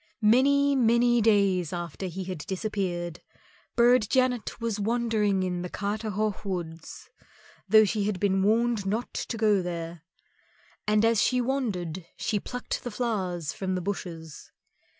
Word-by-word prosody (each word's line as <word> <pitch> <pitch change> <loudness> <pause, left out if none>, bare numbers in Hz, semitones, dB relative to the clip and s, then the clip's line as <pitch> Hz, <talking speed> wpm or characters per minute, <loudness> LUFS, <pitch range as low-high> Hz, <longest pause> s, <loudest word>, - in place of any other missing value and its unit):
Many, 280 +5 +4
many 240 -1 +4
days 200 -6 +3
after 175 +1 -4
he 185 +2 -5
had 185 -3 -5
disappeared, 185 -4 -3 0.5
Burd 240 -2 +4
Janet 255 -3 +1
was 230 -3 -2
wandering 215 -3 +1
in 180 -1 -2
Carterhaugh 210 +2 -2
Wood, 175 -5 -4 0.9
though 215 +1 +7
she 210 0 -1
had 205 -3 -1
been 195 -1 +2
warned 220 0 +2
not 220 +5 -2
to 230 - -4
go 210 -3 +3
there. 170 -2 -5 0.9
And 210 +1 +3
as 225 -2 +3
she 255 - +2
wandered 195 - -2
she 215 -2 -1
plucked 250 +5 -5
the 245 - -3
flowers 190 - -2
from 185 -1 -2
the 180 - -2
bushes. 170 -5 -6
205 Hz, 135 wpm, -27 LUFS, 180-230 Hz, 0.9 s, though